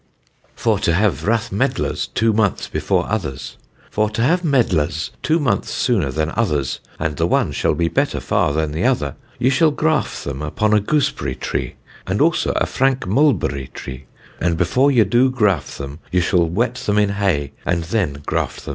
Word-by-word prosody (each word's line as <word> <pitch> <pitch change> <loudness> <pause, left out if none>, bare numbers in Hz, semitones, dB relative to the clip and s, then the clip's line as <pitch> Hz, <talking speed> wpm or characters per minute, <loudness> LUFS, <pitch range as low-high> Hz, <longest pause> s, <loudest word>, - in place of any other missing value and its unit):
FOR - - +1
TO 85 - +1
HAVE 100 +1 +1
RATH 115 +1 +1
MEDLARS 95 - -1
TWO 115 0 +3
MONTHS 105 -2 0
BEFORE - - 0
OTHERS. 75 -11 -4 0.3
For 105 0 +1
to 110 +2 -1
have 170 +8 +3
Medlars 90 - +1
two 160 +2 +2
months 120 -10 0
sooner 100 - +1
than 75 +4 -1
others 75 - 0 0.2
and 75 -2 -2
the - - +1
one - - +1
shall - - 0
be 85 +2 +1
better - - 0
far - - +1
than 80 0 -1
the 80 +6 -2
other, 115 - +1 0.2
ye 130 - +2
shall 155 +4 +4
graffe 80 - 0
them 70 0 -5
upon 105 +8 0
a 105 - +5
gooseberry 115 - 0
tree, - - -3 0.3
and - - -1
also - - +2
a - - +2
franke 135 0 0
mulberry 95 - +1
tree, 65 +1 -8 0.3
and 85 -2 0
before 125 +11 +3
ye 125 -5 +5
do 120 +6 +3
graffe 105 - 0
them, 70 +2 -7
ye 90 - +2
shall 90 -1 +2
wet 115 +7 0
them 105 0 +2
in 105 -1 +3
hay, 95 -9 0
and 85 -1 0
then 80 -6 -2
graffe - - -2
them. - - -9
100 Hz, 185 wpm, -20 LUFS, 75-115 Hz, 0.3 s, a